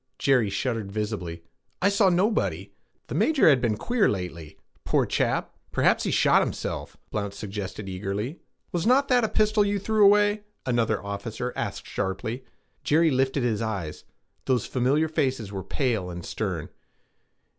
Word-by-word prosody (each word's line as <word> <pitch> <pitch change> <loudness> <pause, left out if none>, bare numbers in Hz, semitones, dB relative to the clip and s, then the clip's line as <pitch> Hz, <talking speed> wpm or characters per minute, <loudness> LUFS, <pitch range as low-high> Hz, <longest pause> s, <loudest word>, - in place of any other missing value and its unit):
Jerry 125 -6 +3
shuddered 110 0 -2
visibly. 100 -6 -4 0.4
'I 200 - +3
saw 200 -1 +4
nobody!' 100 - 0 0.3
'The - - -7
major 235 - +3
has 140 -5 +6
been 115 -4 0
queer 240 - +2
lately, 90 -5 -5 0.3
poor - - +2
chap. - - 0 0.2
Perhaps - - +2
he - - 0
shot - - +4
himself,' - - -4
Blount 100 -1 -3
suggested 100 0 -6
eagerly. 100 - -4 0.3
'Was 175 +3 -1
not 270 +3 +4
that 250 -2 +4
a 220 - +1
pistol 215 0 +3
you 205 0 0
threw 215 +2 +2
away?' 205 +1 +5 0.2
another 120 -4 +1
officer 105 +5 -4
asked - - -4
sharply. 105 +6 -3 0.4
Jerry 160 +2 +3
lifted 130 0 +1
his 115 -3 0
eyes. 95 -9 -4 0.4
Those 125 -4 +1
familiar 135 +5 +1
faces 130 -9 -1
were 95 -2 -5
pale 115 -9 -1
and 85 -1 -7
stern. - - -3
120 Hz, 150 wpm, -26 LUFS, -, 0.4 s, has